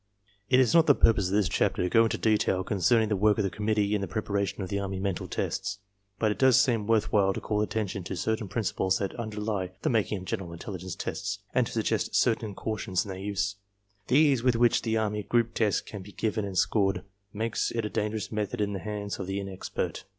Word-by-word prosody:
It 130 - +5
is 130 +1 +4
not 165 -1 +6
the 145 - +7
purpose 110 -5 +3
of 95 - -1
this 105 -3 +3
chapter - - +1
to - - +1
go 115 +5 +5
into 115 - -1
detail 105 -4 +2
concern 110 +5 +3
ing 110 - -2
the 105 - +1
work 105 +2 +3
of 105 - +1
the 95 - -1
conmiittee 105 -1 0
in 105 - +1
the 100 - -2
preparation 100 -3 -2
of 95 - -6
the 100 - -1
army 95 -1 -3
mental 95 -2 -2
tests. - - -2 0.4
But 110 +1 +1
it - - -4
does 130 -1 +6
seem 115 -6 +2
worth 110 -2 +2
while 95 -2 +4
to - - -4
call 105 -1 -1
attention 105 -3 -2
to 95 - -4
certain 110 +5 -1
principles 95 -3 0
that 100 - -3
underlie 105 -4 -3
the - - +2
making 110 -2 +1
of 95 - -8
general 90 -5 -4
intelli 95 0 -7
gence 95 -1 -6
tests 100 +1 -3 0.2
and 125 -2 +2
to - - -8
suggest 110 -1 0
certain 110 -4 +1
cautions 100 -2 -2
in - - -9
their 95 -1 -5
use. 100 0 -2 0.5
The 130 - +4
ease 145 -5 +4
with 125 -1 +3
which 120 0 +3
the 110 -1 0
army 105 -1 -1
group 115 +2 +1
test 105 -4 +1
can 105 - -7
be 100 +1 -12
given 110 -1 -1
and 95 -2 -5
scored 95 -1 +2 0.3
makes 110 +2 -1
it 115 -2 -2
a - - 0
dangerous 105 0 -2
method 105 -2 -2
in 105 -1 0
the 95 - -3
hands 105 -1 -4
of 95 - -4
the 95 +1 -2
inexpert. 95 -1 -4
105 Hz, 240 wpm, -28 LUFS, 95-110 Hz, 0.5 s, the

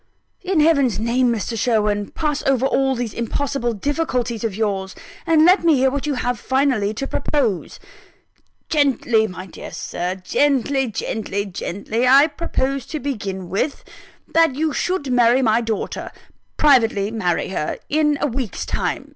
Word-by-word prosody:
"In 370 -4 +1
Heaven's 280 - +3
name, 240 +3 +1
Mr. 230 0 -2
Sherwin, 210 -3 0
pass 300 -2 -2
over 265 -1 +2
all 270 0 +1
these 235 -3 -3
impossible 240 +1 -2
difficulties 250 -2 -2
of 220 -4 -2
yours! 195 -3 -2 0.3
and 320 -1 +5
let 365 +1 +5
me 330 -3 +5
hear 265 0 +3
what 280 +2 -3
you 290 - 0
have 245 -1 -2
finally 260 -6 +1
to 275 - -3
propose." 235 - -1 0.9
"Gently, 250 -7 +2
my 185 -1 -8
dear 185 - -10
Sir! 180 +2 -4
gently, 270 +6 +1
gently, 205 -2 -3
gently! 205 +5 -2
I 275 +3 +7
propose 275 -4 -2
to 310 - -4
begin 200 -9 -4
with: 200 - -2 0.5
that 325 -5 +4
you 310 +1 0
should 360 -6 -1
marry 245 +1 +4
my 225 0 +3
daughter 225 -2 -3 0.5
privately 225 -8 +3
marry 180 -7 -1
her 170 -5 -3
in 300 -1 +2
a - - +2
week's 255 -5 -3
time. - - -3
250 Hz, 150 wpm, -20 LUFS, 215-285 Hz, 0.9 s, I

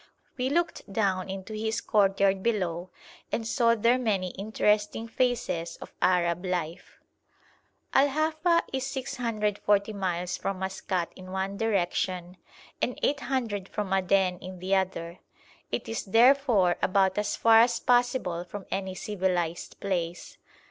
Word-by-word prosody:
We 255 0 -1
looked 335 -8 -1
down 195 -2 0
into 195 +3 -6
his 220 +1 -1
courtyard 195 -1 +2
below 185 -5 -1 0.4
and 225 - -1
saw 230 0 +3
there 235 +3 +3
many 200 -7 0
interesting 210 +2 0
phases 230 -9 -1
of - - -11
Arab 175 -1 +2
life. 175 -2 -4 1.0
Al 275 +2 +5
Hafa 315 +4 +1
is 265 -1 -1
640 220 -6 -1
miles 180 -2 -2
from 195 -1 -3
Maskat 190 -2 -2
in 185 0 -11
one 190 +1 -2
direction 185 -4 -1 0.4
and 250 - -1
800 245 -8 -1
from 205 -3 -3
Aden 190 -1 +2
in 185 0 -8
the 185 +2 -2
other; 185 -2 -2 0.5
it - - -3
is, 225 - -3
therefore, 230 -4 +4
about 190 +1 +2
as 210 - -1
far 225 -1 +6
as 235 0 +4
possible 245 -8 +1
from 190 +2 -8
any 190 -1 -3
civilised 180 -4 -2
place. 175 -3 -3
195 Hz, 130 wpm, -28 LUFS, 185-230 Hz, 1.0 s, far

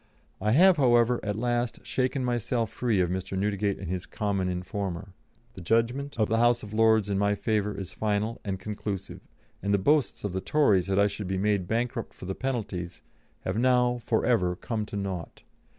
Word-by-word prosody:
I 105 +2 +2
have, 180 +5 +6
however, 120 -3 +4
at 105 -1 -2
last 120 +1 -1
shaken 130 0 0
myself 120 -2 -1
free 115 -6 +1
of 90 -1 0
Mr. 95 +1 -3
Newdegate 100 0 0
and 95 - -7
his 90 +1 -3
common 100 -3 -1
informer. 95 0 -4 0.4
The 95 - -9
judgment 115 +9 0
of 110 - +3
the 115 +1 +1
House 120 0 +3
of 105 0 -8
Lords 110 -1 +4
in 100 -1 0
my 100 0 +2
favour 105 -1 -1
is 95 -2 -6
final 105 +1 -1
and 95 -2 -3
conclusive, 100 -1 -5 0.4
and 100 +1 +2
the - - +3
boasts 145 +7 +1
of 100 -3 -3
the 95 - -2
Tories 105 - +3
that 95 0 0
I 100 - +5
should 100 -1 -3
be 95 0 -1
made 100 -2 +1
bankrupt 115 +1 -2
for - - -10
the 95 - -2
penalties, 105 -9 -4 0.4
have 95 +4 -2
now, 125 -1 +3
for 110 - +1
ever, 90 -7 +2
come 110 +2 -3
to 105 - -5
naught. 95 -4 -5
105 Hz, 195 wpm, -27 LUFS, 95-120 Hz, 0.4 s, have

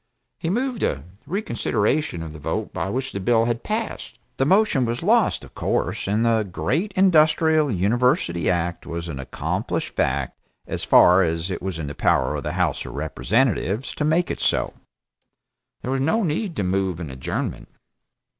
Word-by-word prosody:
He 165 - -2
moved 245 +4 -1
a 70 -1 0 0.2
reconsideration 120 - -1
of 80 -2 -7
the 75 - -10
vote 70 - -3
by - - -2
which 130 +5 -2
the 100 - -4
bill 115 +3 +3
had 120 -1 -1
passed. 215 - -4 0.2
The 135 - +2
motion 195 -7 +3
was 120 +3 -2
lost, 220 +2 +3
of - - -14
course, - - -1
and 105 +4 +1
the 115 -1 +3
great 140 - -1
Industrial 160 -4 +4
University 100 -5 +1
act 85 -1 -1
was 85 0 -4
an 70 -5 -5
accomplished 65 - -3
fact 65 0 -1 0.3
as - - -4
far 90 +2 +6
as 85 +1 -1
it 90 - -4
was 95 -2 -3
in 80 - -4
the 70 - -5
power - - +1
of - - -3
the - - -4
House - - 0
of 60 - -8
Representatives 105 - 0
to - - -3
make 160 +4 +2
it - - -4
so. - - +1 1.1
There 125 - -2
was 135 0 0
no 215 +11 +2
need 170 +2 -1
to 100 - -1
move 95 -2 0
an 80 -5 -6
adjournment. 65 0 -4
115 Hz, 175 wpm, -23 LUFS, -, 1.1 s, far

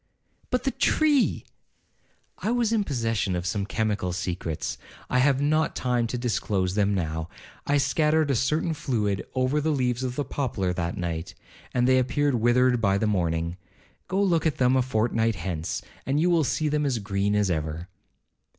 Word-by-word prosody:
'But 250 - 0
the 270 - +1
tree—' 295 -2 +2 0.9
'I - - -2
was 235 -2 +1
in 215 -2 +2
possession 115 - -1
of 90 0 -3
some 100 +1 -1
chemical 105 -5 -1
secrets—I 90 +6 -4
have 135 +1 +3
not 155 +1 +1
time 120 -2 0
to 125 - -3
disclose 105 -6 -1
them 100 0 +2
now—I 80 - -3
scattered 155 +1 +2
a - - +2
certain 150 +7 +1
fluid 105 -9 -1
over 130 +4 +1
the 160 - 0
leaves 125 -4 0
of 125 -1 -3
the 145 - -2
poplar 100 -10 -2
that 85 +1 -3
night, 85 -3 -4 0.4
and 125 0 +2
they 130 0 +5
appeared 145 +3 +1
withered 120 +1 +3
by 100 -2 +3
the 110 - 0
morning—go 85 - -3
look 170 -5 +2
at 155 - -1
them 125 0 +3
a 130 - +4
fortnight 115 -2 +1
hence, 85 -1 -4 0.2
and 140 +2 0
you 175 +3 +3
will 165 -2 +3
see 155 +3 0
them 150 0 0
as 135 -4 0
green 100 -1 -1
as 105 -3 +2
ever.' 80 +1 -3
120 Hz, 170 wpm, -26 LUFS, 95-145 Hz, 0.9 s, they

